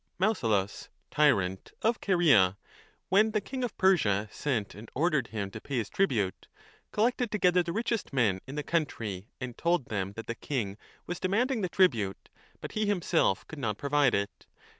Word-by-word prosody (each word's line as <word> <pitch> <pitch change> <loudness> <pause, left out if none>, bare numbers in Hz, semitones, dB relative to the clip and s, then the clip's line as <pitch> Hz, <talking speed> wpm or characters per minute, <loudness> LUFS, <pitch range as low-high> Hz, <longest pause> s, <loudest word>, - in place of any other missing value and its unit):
1 200 +5 +3
5 - - -11
Mausolus, 100 -2 -1 0.2
tyrant 95 -11 +2
of 225 +1 +1
Caria, 135 - +4 0.5
when 210 +4 +5
the 215 - +2
king 255 +5 -5
of 240 -4 -3
Persia 110 - +3
sent 125 -9 -2
and 105 +2 -11
ordered 150 -4 +1
him 100 -3 -4
to - - -8
pay 140 -2 -3
his 110 -3 -2
tribute, 110 - 0 0.4
collected 240 +2 +1
together 180 -4 +3
the 170 -1 -3
richest 230 +2 -2
men 110 -9 +2
in 135 - -7
the 150 - -2
country 115 - -2
and 125 -2 -5
told 170 -5 +1
them 100 -2 -2
that 115 +2 -7
the 115 - -3
king 115 -5 -3 0.3
was 175 +1 -4
demanding 225 +6 +1
the 185 - -1
tribute, 115 - +1 0.3
but - - -6
he 215 -1 -1
himself 180 - +1
could 155 - -9
not 105 -6 -2
provide 140 -1 +2
it. 100 +1 -3
145 Hz, 180 wpm, -29 LUFS, -, 0.5 s, when